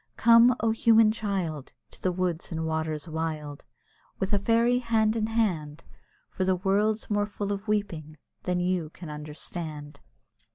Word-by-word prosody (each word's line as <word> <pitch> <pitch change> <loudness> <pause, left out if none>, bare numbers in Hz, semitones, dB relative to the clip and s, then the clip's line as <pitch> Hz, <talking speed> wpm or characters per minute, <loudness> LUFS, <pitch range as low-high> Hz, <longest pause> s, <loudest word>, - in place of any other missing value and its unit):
Come! 235 +1 +6
O, 225 0 +2
human 225 -1 +5
child! 190 - -3 0.2
To - - -13
the 185 - +1
woods 180 -2 -2
and 160 -1 -2
waters 160 -1 -2
wild, 155 -3 -4 0.5
With 195 +2 -2
a 205 - +3
fairy 235 +4 +3
hand 225 -2 +1
in 220 -1 0
hand, 170 -9 -1 0.5
For 185 - -2
the 185 0 +2
world's 205 +4 0
more 205 0 +1
full 205 -1 -4
of 200 +2 -7
weeping 165 -8 -2 0.2
than 180 -1 -1
you 180 -3 -1
can 165 -1 -10
understand. 150 0 -6
185 Hz, 155 wpm, -27 LUFS, 160-215 Hz, 0.5 s, Come